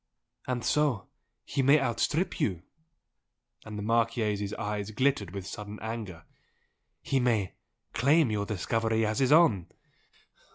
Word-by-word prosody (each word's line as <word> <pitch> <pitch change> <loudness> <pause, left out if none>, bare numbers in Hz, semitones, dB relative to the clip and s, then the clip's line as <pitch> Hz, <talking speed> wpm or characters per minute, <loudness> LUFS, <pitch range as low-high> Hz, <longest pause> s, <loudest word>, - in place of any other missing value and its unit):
"And 125 -2 -2
so 145 -10 +1 0.4
he 140 - -1
may 140 +3 +5
outstrip 135 - 0
you?" 90 -4 -1 1.0
And 110 -1 -7
the 105 - -4
Marchese's 110 -3 0
eyes 105 -1 -3
glittered 130 -3 +1
with 95 +1 -6
sudden 105 +1 -7
anger 110 -7 -6 0.8
"He 135 - +1
may 115 -7 +1 0.4
claim 140 +2 +3
YOUR 100 -1 -1
discovery 110 +2 0
as 110 +4 -1
his 130 -1 +2
own?" 130 - +5
110 Hz, 125 wpm, -29 LUFS, 105-130 Hz, 1.0 s, may